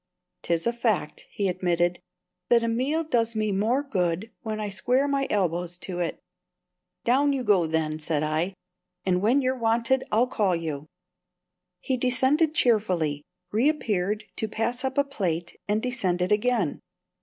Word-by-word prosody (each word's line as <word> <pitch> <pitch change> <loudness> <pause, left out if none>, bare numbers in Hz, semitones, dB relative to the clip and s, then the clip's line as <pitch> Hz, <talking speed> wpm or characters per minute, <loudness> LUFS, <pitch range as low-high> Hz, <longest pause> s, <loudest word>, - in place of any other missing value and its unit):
"'Tis 170 -1 -1
a 235 - +1
fact," 225 -9 -1
he 200 - -1
admitted, 175 -1 0 0.5
"that 235 -1 +5
a - - 0
meal 265 +8 0
does 230 -7 +1
me 215 -1 0
more 225 +8 +1
good 185 -4 -1
when 215 -1 -4
I 210 - -2
square 250 +8 +1
my 275 -1 0
elbows 175 -3 0
to 180 -1 -5
it." 170 -2 -2 0.8
"Down 275 +4 +3
you 265 -2 -1
go, 195 -7 +3
then," 155 -1 -1
said 155 -1 -1
I; 160 +5 -1 0.5
"and 180 -1 +2
when 250 +7 +3
you're 255 +1 +1
wanted 230 +3 +2
I'll 225 +3 +4
call 205 -7 +1
you." 155 -3 -4 0.9
He 260 - -1
descended 265 +6 +2
cheerfully, 180 - +2 0.3
reappeared 215 -5 +1
to 220 - 0
pass 235 +4 -2
up 265 0 -2
a 280 - +5
plate, 180 - -3
and 210 +1 0
descended 185 -8 0
again. 210 -6 +1
215 Hz, 155 wpm, -26 LUFS, 180-250 Hz, 0.9 s, that